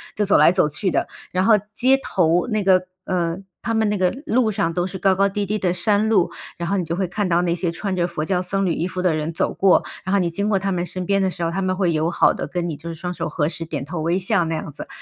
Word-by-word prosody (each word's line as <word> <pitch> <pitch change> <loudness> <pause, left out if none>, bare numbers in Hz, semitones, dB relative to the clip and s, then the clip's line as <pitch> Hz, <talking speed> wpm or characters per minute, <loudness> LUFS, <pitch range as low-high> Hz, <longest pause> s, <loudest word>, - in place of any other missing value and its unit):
就 210 - +1
走 200 - +4
来 155 +3 +6
走 180 -4 +2
去 180 +6 -1
的。 - - 0 0.2
然 185 +1 +1
后 220 0 +6 0.2
街 260 +4 +4
头 175 -7 +1
那 215 -3 -1
个， 185 -1 +4 0.2
呃， 170 -2 -1 0.2
他 230 - -2
们 220 -1 +2
那 210 - 0
个 185 -1 +2
路 240 -6 +2
上 195 -5 -1
都 175 +1 0
是 190 0 -5
高 190 0 +2
高 195 +1 +2
低 205 +1 -2
低 210 +2 -1
的 185 -4 0
山 210 +3 +2
路， 190 -6 +3 0.3
然 170 0 -4
后 200 - +1
你 185 - 0
就 165 0 -3
会 190 +1 -1
看 200 +3 -2
到 170 +1 +3
那 170 -1 0
些 170 -1 -1
穿 190 +3 -3
着 175 -1 +1
佛 165 -3 -3
教 180 0 0
僧 195 +2 0
侣 175 - +1
衣 170 - -2
服 185 0 -4
的 180 -3 +2
人 155 +1 -2
走 - - 0
过。 195 -1 +4 0.2
然 190 - -2
后 200 - +4
你 175 -2 +1
经 200 +5 -1
过 195 -2 +2
他 195 +1 -2
们 175 -1 -1
身 180 +1 -4
边 200 +1 +1
的 190 -1 +1
时 175 -2 -5
候， 165 - 0
他 195 +3 -2
们 185 0 0
会 180 -3 +1
友 160 +2 0
好 - - +4
地 - - -5
跟 175 +2 -3
你 160 - -4
就 160 +4 -8
是 165 - -5
双 180 +2 -5
手 - - -4
合 150 -3 0
十、 165 - -2
点 145 -4 -4
头 160 +2 -5
微 170 +4 +1
笑 190 -1 +1
那 160 0 -2
样 155 - -5
子。 145 - -8
180 Hz, 330 characters per minute, -21 LUFS, 170-195 Hz, 0.3 s, 来